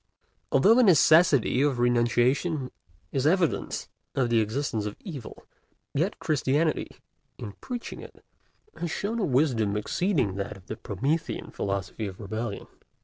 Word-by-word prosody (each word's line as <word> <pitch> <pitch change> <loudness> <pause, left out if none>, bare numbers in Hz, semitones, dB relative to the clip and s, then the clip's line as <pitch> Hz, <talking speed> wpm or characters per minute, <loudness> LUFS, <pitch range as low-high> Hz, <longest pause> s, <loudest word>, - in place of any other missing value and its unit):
Although 195 +12 +6
the 250 - +5
necessity 155 - +5
of 140 -3 +2
renunciation 120 +5 +1 0.4
is 135 +1 +1
evidence 175 -1 0 0.3
of 125 -3 +1
the 115 - +4
existence 110 -1 -1
of 105 - -6
evil, 150 - -9 0.5
yet 170 +8 0
Christianity, 150 +1 0 0.5
in 110 -4 -7
preaching 245 -2 -6
it, - - -14 0.5
has 170 - -3
shown 215 +7 -2
a - - 0
wisdom 125 - +1
exceeding 125 - 0
that 100 +1 -4
of 90 - -18
the 110 - -5
Promethean 140 - -2
philosophy 100 +2 -3
of 95 -2 -9
rebellion. 110 +1 -4
130 Hz, 135 wpm, -27 LUFS, 110-160 Hz, 0.5 s, Although